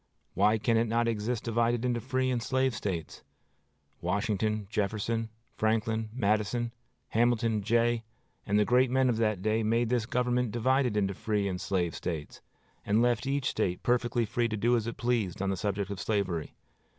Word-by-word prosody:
Why 105 +4 +3
can 115 +2 +2
it 115 +1 +2
not 115 +1 +1
exist 115 +1 -1
divided 115 +1 +1
into 120 -2 0
free 130 +1 0
and 120 -2 0
slave 130 +1 +1
States? 95 -8 -4 0.8
Washington, 105 +2 0
Jefferson, 110 +2 -1 0.3
Franklin, 110 0 0
Madison, 110 +1 0 0.4
Hamilton, 115 -2 +2
Jay, 115 +2 +2 0.4
and 105 +1 +1
the 105 - +4
great 125 +2 +4
men 130 0 +3
of 115 - +1
that 110 -4 0
day 110 +1 +1
made 115 +2 +1
this 120 -2 0
government 125 0 +1
divided 125 0 +1
into 100 -1 +1
free 105 +1 -1
States 100 - 0
and 90 -1 -4
slave 90 -3 -1
States, 80 -4 -5 0.4
and 110 +3 +2
left 120 +1 +1
each 135 -1 0
State 90 -1 -1
perfectly 120 -1 +1
free 120 +2 0
to 110 -1 -3
do 120 +4 +3
as 115 -1 -1
it 115 - -5
pleased 120 -7 0
on 95 0 0
the - - 0
subject 100 +1 -2
of 100 - -5
slavery. 95 -6 -2
115 Hz, 175 wpm, -29 LUFS, 105-120 Hz, 0.8 s, the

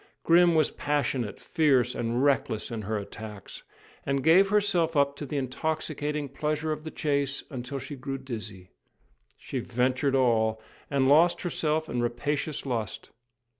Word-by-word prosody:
Grim 170 0 +5
was 155 -2 +3
passionate, 140 -6 -1
fierce, 130 -6 +2
and 120 +2 -1
reckless 135 -5 +1
in 115 -2 -3
her 105 +2 -2
attacks, 105 -1 -8 0.4
and 140 -1 -1
gave 185 +5 +6
herself 180 -6 +2
up 140 0 +3
to 145 - -6
the 145 - -3
intoxicating 150 +2 -2
pleasure 150 +3 -2
of 155 0 -4
the 160 - -5
chase 140 -3 -1
until 130 +1 -5
she 145 +2 -6
grew 135 +1 -4
dizzy. 105 -8 -8 0.7
She 130 - -5
ventured 130 +3 0
all, 110 -4 +2 0.3
and 135 -2 +2
lost 160 +5 +5
herself 155 -3 -1
in 120 - -2
rapacious 145 +5 -2
lust. 115 -9 -4
140 Hz, 145 wpm, -27 LUFS, 120-155 Hz, 0.7 s, gave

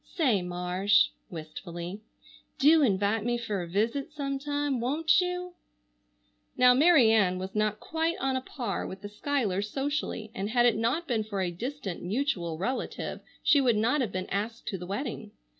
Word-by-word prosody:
Say, 250 - +3
Marsh," 180 +3 +2 0.2
wistfully, 170 +3 -7 0.6
"do 310 +3 +6
invite 205 -3 +2
me 240 +1 0
fer 215 -5 -3
a 175 - -5
visit 230 - -1
sometime, 285 -1 -2
won't 310 +8 +3
you?" 360 0 -3 1.0
Now 250 0 +7
Mary 275 -4 +6
Ann 195 -5 +3
was 190 +1 -5
not 215 0 0
quite 325 +2 -1
on 270 -4 0
a 260 - -1
par 240 -7 -4
with 190 +1 -9
the 205 - -5
Schuylers 210 -4 -1
socially, 270 -5 -3
and 195 +2 -3
had 240 +1 +3
it 240 - +4
not 245 +10 0
been 225 -4 0
for 210 -2 -4
a 180 -2 -1
distant 230 0 -5
mutual 180 - -1
relative 240 +10 -3 0.2
she 295 -2 +5
would 240 -5 +3
not 235 +7 +2
have 230 -7 -1
been 185 -1 -3
asked 220 +3 -3
to 195 - -3
the 180 - -7
wedding. 215 0 -4
225 Hz, 170 wpm, -28 LUFS, 195-280 Hz, 1.0 s, Now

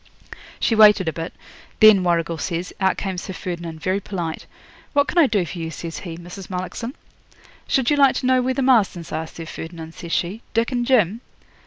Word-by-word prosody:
'She - - +1
waited 210 -4 +6
a 160 - 0
bit. 165 +1 -5 0.5
Then, 215 -3 +8
Warrigal 170 -2 0
says, 175 +3 -3
out 190 0 +2
came 190 -2 -3
Sir 190 - -6
Ferdinand, 170 -3 -6
very 185 +3 0
polite. 175 -5 -5 0.5
"What 285 -1 +3
can 350 - +1
I 315 - +6
do 205 -6 +1
for 175 +1 -7
you," 165 -1 -3
says 165 -1 -6
he, 165 0 -7
"Mrs. 175 +2 -10
Mullockson?" 185 +7 -5 0.7
'"Should 265 +1 +2
you 295 - +3
like 275 -2 +5
to - - -2
know 255 0 +4
where 255 +1 -1
the 275 - 0
Marstons 210 -10 +2
are, 160 +1 -3
Sir 165 +1 -9
Ferdinand," 160 0 -8
says 170 0 -9
she, 185 +8 -1
"Dick 230 +2 +1
and 240 -1 -1
Jim?" 225 -4 +3
185 Hz, 200 wpm, -22 LUFS, 170-230 Hz, 0.7 s, Then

